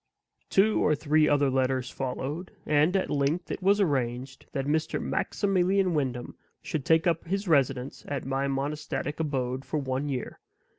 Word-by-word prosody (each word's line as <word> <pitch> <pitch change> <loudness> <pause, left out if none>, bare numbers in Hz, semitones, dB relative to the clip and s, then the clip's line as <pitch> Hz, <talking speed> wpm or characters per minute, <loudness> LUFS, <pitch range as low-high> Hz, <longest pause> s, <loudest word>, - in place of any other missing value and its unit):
Two 210 +3 +3
or 150 - +3
three 150 +1 +3
other 145 -2 +3
letters 130 0 0
followed; 140 +6 -4 0.2
and 155 +5 +3
at 190 - -2
length 145 +5 0
it - - -4
was 200 +2 +4
arranged 130 -6 -1
that 135 -1 -2
Mr. 155 +2 0
Maximilian 190 -2 +1
Wyndham 130 -5 -2 0.2
should 150 -4 -4
take 160 0 +4
up 170 -2 +1
his 195 +3 -2
residence 135 -4 +1
at 140 -3 -3
my 135 +1 0
monastic 140 +1 -3
abode 130 -4 -1
for 135 +3 -3
one 135 0 -2
year. 130 -3 -4
145 Hz, 155 wpm, -28 LUFS, 135-165 Hz, 0.2 s, was